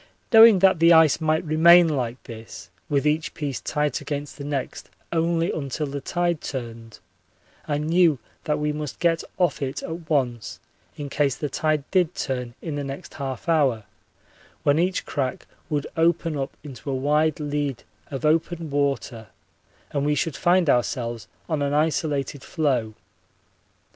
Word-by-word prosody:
Knowing 225 -2 +9
that 190 -2 +4
the 165 +1 +6
ice 160 -2 +6
might 155 +1 +1
remain 170 +3 +6
like 125 -5 -2
this 110 -6 -10 0.2
with 140 0 +1
each 150 +1 0
piece 145 -5 -4
tight 150 -3 -1
against 145 -1 -5
the 145 - -8
next 140 -2 -4 0.2
only 165 +1 +1
until 145 0 -3
the 140 0 -5
tide 175 -1 -1
turned, 115 -4 -7 0.7
I 145 - 0
knew 160 0 +3 0.3
that 150 -1 0
we 150 0 -1
must 150 -2 -5
get 165 -2 +2
off 180 -4 +1
it 135 -1 -3
at 165 -1 -7
once 125 -7 -1 0.4
in 145 - -5
case 140 -2 +1
the 145 -1 -4
tide 155 0 0
did 180 -3 +2
turn 125 -3 -3
in 155 -4 -4
the 145 - -3
next 135 0 -7
half 135 +2 -5
hour, 140 -9 +2 0.8
when 145 +2 +3
each 180 +2 0
crack 135 -3 -3 0.2
would 145 -2 -1
open 165 -1 +1
up 135 -1 -4
into 140 -1 -8
a 135 - -1
wide 150 +3 +1
lead 145 -3 -2 0.3
of 135 0 -4
open 160 0 0
water 140 -5 -1 0.6
and 140 - -1
we 150 +1 +1
should 160 0 -1
find 175 -1 +3
ourselves 120 -3 0 0.2
on 155 -3 -1
an 140 0 0
isolated 150 -3 0
floe. 130 -10 -1
150 Hz, 160 wpm, -24 LUFS, 135-160 Hz, 0.8 s, Knowing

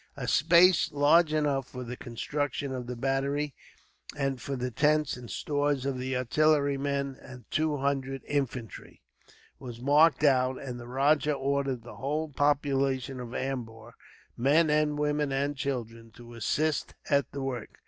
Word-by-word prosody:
A 125 -3 -4
space 170 +3 +5
large 150 +3 +4
enough 145 -4 0
for 125 -1 -7
the 125 +1 -6
construction 140 +3 -3
of 125 -2 -5
the 125 - -4
battery, 135 +3 -1 0.6
and 135 -3 -1
for 140 - -4
the 125 0 -3
tents 150 +3 +2
and 125 -1 -10
stores 145 -2 -1
of 135 -2 -2
the 130 0 -2
artillerymen 140 0 +1
and 125 -3 -12
two 155 -1 +1
hundred 135 -1 -2
infantry, 130 -5 -4 0.6
was 120 -3 -8
marked 150 +4 +4
out; 130 -2 +3
and 125 -3 -6
the 120 - -9
rajah 145 +4 +2
ordered 135 -3 -1
the 120 - -11
whole 150 +3 -2
population 135 -2 0
of 120 0 -7
Ambur, 120 -4 -5 0.4
men, 150 +3 +3
women, 150 -1 0
and 140 +2 -1
children, 115 -5 -4
to 120 0 -13
assist 150 +7 -1
at 140 -3 +1
the 140 -1 -5
work. 125 -5 -5
140 Hz, 150 wpm, -28 LUFS, 125-145 Hz, 0.6 s, space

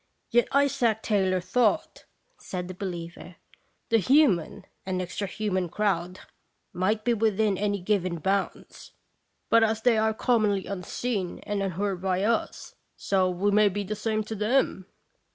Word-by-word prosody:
" - - -47
"Yet 240 +1 +3
Isaac 270 -6 +2
Taylor 190 -3 +1
thought," 245 - 0 0.3
said 180 -1 -5
the 185 - -6
be 190 +2 -5
liever, 170 0 -8 0.5
"the 225 - +4
human 235 - +2 0.2
and 185 -1 -2
extra 185 +3 -4
human 190 -3 -2
crowd 180 -2 -1 0.5
might 210 +4 0
be 240 - +3
within 215 -2 +1
any 205 +1 -1
given 185 -2 -1
bounds; 190 +4 -3 0.6
but 230 0 +6
as 220 0 0
they 235 -3 +4
are 220 0 +1
commonly 215 -6 +1
unseen 195 0 -3
and 205 -1 -2
unheard 195 0 -2
by 190 0 0
us, 230 +2 -1 0.2
so 190 -2 +1
we 185 +3 0
may 210 0 +5
be 205 +1 -3
the 210 +2 -4
same 215 +1 -1
to 220 - -6
them." 215 -3 0
205 Hz, 150 wpm, -26 LUFS, 185-220 Hz, 0.6 s, but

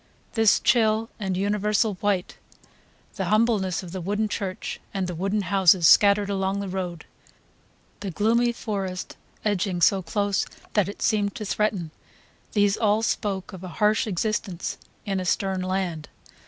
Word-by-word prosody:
This 225 -3 +4
chill 225 -1 +2
and 190 -3 -2
universal 210 +2 +1
white, 200 -3 -1 0.8
the 190 - -1
humbleness 210 -3 +1
of 175 - -9
the 185 0 -5
wooden 205 +4 -1
church 195 -3 -4 0.2
and 190 -1 0
the 180 - -4
wooden 195 +4 -1
houses 185 -3 +4
scattered 200 0 +6
along 195 0 -1
the 200 - -4
road, 180 -3 -4 0.9
the 200 - -4
gloomy 230 +7 +2
forest 195 -5 -4 0.3
edging 195 -3 0
so 190 +3 +4
close 200 +3 -1 0.3
that 205 -3 +2
it 205 - -6
seemed 205 -2 +1
to 215 - -5
threaten, 200 -6 -1 0.6
these 205 -1 +3
all 215 0 +2
spoke 200 -4 -2
of 190 -1 -9
a - - -5
harsh 215 +1 +2
existence 200 -1 -2 0.3
in 195 -2 -1
a - - -2
stern 190 +1 0
land. 185 -4 -2
200 Hz, 150 wpm, -25 LUFS, 185-210 Hz, 0.9 s, scattered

